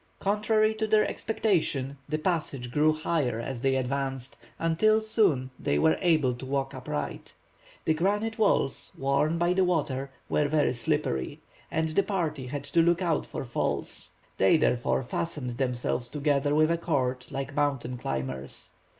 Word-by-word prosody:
Contrary 215 +2 +2
to 220 0 -2
their 215 0 +4
expectation, 160 -11 0
the 155 - 0
passage 150 -7 -2
grew 150 +3 +4
higher 155 -7 -1
as 120 +1 -4
they 135 0 +2
advanced, 135 0 -2 0.2
until 190 +7 +3
soon 195 - +2
they 70 - 0
were 160 - +4
able 155 -8 +3
to 120 - -9
walk 135 0 -2
upright. 130 - -5 0.5
The 160 - +3
granite 205 +7 0
walls, 200 -9 +1
worn, 140 +4 +1
by 175 +1 +2
the 190 +1 +3
water, 145 -6 0 0.2
were 150 - +1
very 150 -3 +2
slippery, 90 - -1 0.3
and 160 0 0
the 155 +5 +3
party 160 -10 -2
had 140 +2 -4
to 145 +4 +2
look 170 +2 +3
out 165 -4 0
for - - -5
falls. 120 - -3 0.3
They, 95 +11 +5
therefore, 130 -3 +1
fastened 125 -2 -4
themselves 125 -1 -1
together 145 0 +1
with 155 +1 +4
a 170 - +1
cord, 130 -6 -1
like 135 +2 -4
mountain 135 -4 -1
climbers. 65 - -4
145 Hz, 155 wpm, -28 LUFS, 130-170 Hz, 0.5 s, They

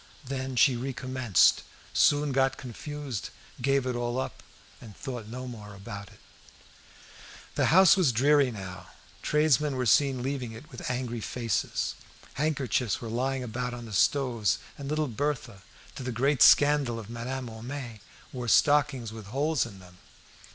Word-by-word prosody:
Then 130 0 -4
she 130 +1 +5
recommenced, 130 -3 +2 0.3
soon 145 0 +3
got 135 0 +2
confused, 135 -1 -6 0.3
gave 135 +1 +2
it 125 -1 -1
all 120 0 -2
up, 130 - -5 0.4
and 105 -5 -12
thought 125 -5 -6
no 130 +3 -6
more 105 -4 -9
about 100 0 -8
it. - - -18 1.3
The - - +2
house 190 +2 +7
was 185 -7 +3
very 115 -2 0
dreary 140 -1 +4
now. 90 -4 -8 0.3
Tradesmen 150 -2 +2
were 130 -1 -1
seen 130 0 +3
leaving 130 -4 -3
it 135 +8 -12
with 125 - -6
angry 125 -2 -3
faces. 115 -3 -2 0.4
Handkerchiefs 135 -6 0
were 115 - -6
lying 130 +3 -1
about 125 +1 -4
on 120 -1 -8
the 110 - -9
stoves, 120 +1 +2 0.2
and 140 -1 -7
little 155 0 0
Berthe, 125 -5 -3 0.3
to - - -8
the 125 0 -3
great 135 +3 +1
scandal 145 -5 +6
of 110 -3 -7
Madame 125 +3 -5
Homais, 120 0 -7 0.3
wore 125 -2 -4
stockings 140 -3 +3
with 110 -3 -9
holes 140 +3 0
in 100 -4 -12
them. 90 -1 -16
125 Hz, 155 wpm, -28 LUFS, 115-140 Hz, 1.3 s, house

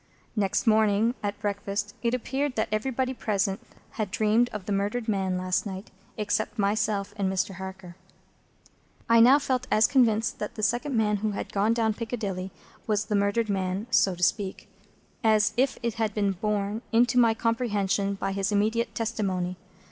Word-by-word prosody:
Next 200 0 0
morning 220 0 +3
at 205 0 -3
breakfast, 205 0 -3
it 235 0 +1
appeared 265 +2 -2
that 220 - 0
everybody 255 +4 -1
present 200 -4 -1 0.3
had 215 -3 -3
dreamed 215 +5 +2
of 210 -3 -7
the 205 - -4
murdered 205 +4 -1
man 190 -3 0
last 185 0 0
night, 195 0 -7 0.3
except 215 +2 -1
myself 205 0 0
and 195 -2 0
Mr. 190 0 -2
Harker. 190 -2 -8 1.1
I 230 0 +5
now 250 +5 +8
felt 255 -3 -1
as 215 +1 +5
convinced 230 -4 +2
that 210 - -5
the 215 - -5
second 240 +5 0
man 210 -1 +2
who 210 +1 -2
had - - -5
gone 210 +3 +2
down 225 -2 +1
Piccadilly 205 -5 -4 0.4
was 210 -1 +1
the 210 0 -1
murdered 205 +3 +1
man 190 0 -1
(so 190 -5 +3
to 180 - -5
speak), 200 +2 0 0.6
as 215 -1 +3
if 260 +2 +1
it 235 -1 0
had 220 -2 -2
been 200 -2 +1
borne 205 +2 -2
into 240 +1 +4
my 230 -2 +4
comprehension 205 -4 0
by 195 0 -3
his 195 +1 -1
immediate 220 +3 0
testimony. 195 -6 -2
210 Hz, 170 wpm, -27 LUFS, 200-230 Hz, 1.1 s, now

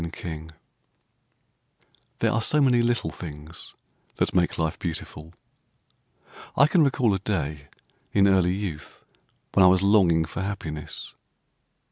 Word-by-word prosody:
HAPPINESS 80 -1 -7 1.7
THERE - - +3
are 115 - 0
so 150 +6 +3
many 125 -4 +4
little 120 0 0
things 80 -1 -9 0.4
that - - 0
make 90 -2 +1
life 80 -1 -2
beautiful. 80 -2 -5 1.3
I 140 - +7
can 160 +2 +3
recall 125 -6 +2
a 95 - -1
day 75 -7 -3 0.4
in 100 -1 +4
early 95 -2 +3
youth 90 -7 -7 0.5
when 95 - +5
I - - +8
was 95 +1 +3
longing 90 -6 +4
for 80 - -6
happiness. 80 -7 -6
90 Hz, 125 wpm, -25 LUFS, 80-105 Hz, 1.7 s, I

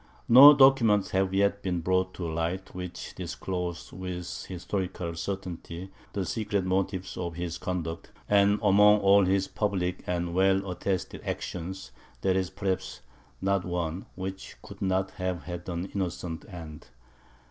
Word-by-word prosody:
No 140 +5 +10
documents 130 -7 +5
have 95 0 +1
yet 100 +1 +2
been 90 -2 -1
brought 95 +2 0
to 85 - -4
light, 85 +4 -3
which 90 -1 -7
disclose 90 -2 -5
with 90 -1 -5
historical 90 -1 -3
certainty 90 0 -5 0.2
the 100 -2 -1
secret 100 +1 -1
motives 95 0 -1
of 85 -2 -4
his 85 -1 -4
conduct; 85 -3 -4 0.2
and 100 0 +4
among 105 +1 +6
all 100 0 +6
his 95 +1 +1
public 95 -4 -1
and 85 -1 -1
well 95 +1 +3
attested 90 +1 -3
actions, 95 +2 -5 0.3
there 95 -1 +2
is, 95 -1 0
perhaps, 95 - -3 0.4
not 100 -1 +2
one 90 0 -3
which 95 +1 -6
could - - -12
not 95 0 0
have 90 -2 -3
had 90 0 -6
an 85 +1 -3
innocent 90 -1 -4
end. 80 -4 -9
95 Hz, 140 wpm, -28 LUFS, 90-100 Hz, 0.4 s, No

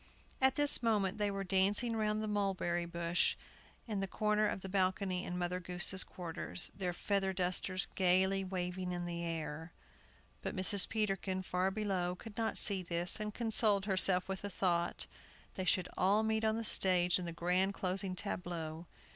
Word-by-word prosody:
At 265 0 +4
this 290 -1 +8
moment 215 -3 0
they 205 -1 +1
were 195 0 -3
dancing 200 +5 +1
round 215 0 -1
the - - -2
barberry 190 -4 -1
bush, 170 0 0 0.5
in 210 -3 -2
a 195 - -2
corner 210 +2 +1
of 195 - -3
the 190 - -6
balcony 185 -1 0
in 180 - -4
Mother 180 0 -2
Goose's 180 +1 +2
quarters, 175 0 -4
their 185 -2 -2
feather 195 +2 -1
dusters 185 +1 0
gayly 190 +1 +2
waving 180 -1 -4
in 175 0 -3
the 170 -1 -4
air. 160 -1 -5 0.7
But - - -4
Mrs. 190 +1 +2
Peterkin, 195 -3 -1
far 185 +1 0
below, 190 -3 -2
could 215 +3 -11
not 225 0 -1
see 195 -2 +5
this, 175 +2 0
and 210 0 -3
consoled 215 -3 +2
herself 185 -2 +3
with 190 0 -4
the 205 - -4
thought, 175 -3 -1 0.5
they 185 - -4
should 185 0 +2
all 200 +4 +2
meet 220 0 0
on 220 0 +1
the 230 - -4
stage 180 -3 +2
in 180 - -5
the 170 - -4
grand 180 +3 0
closing 185 0 -1
tableau. 175 -4 -5
190 Hz, 170 wpm, -34 LUFS, 180-205 Hz, 0.7 s, this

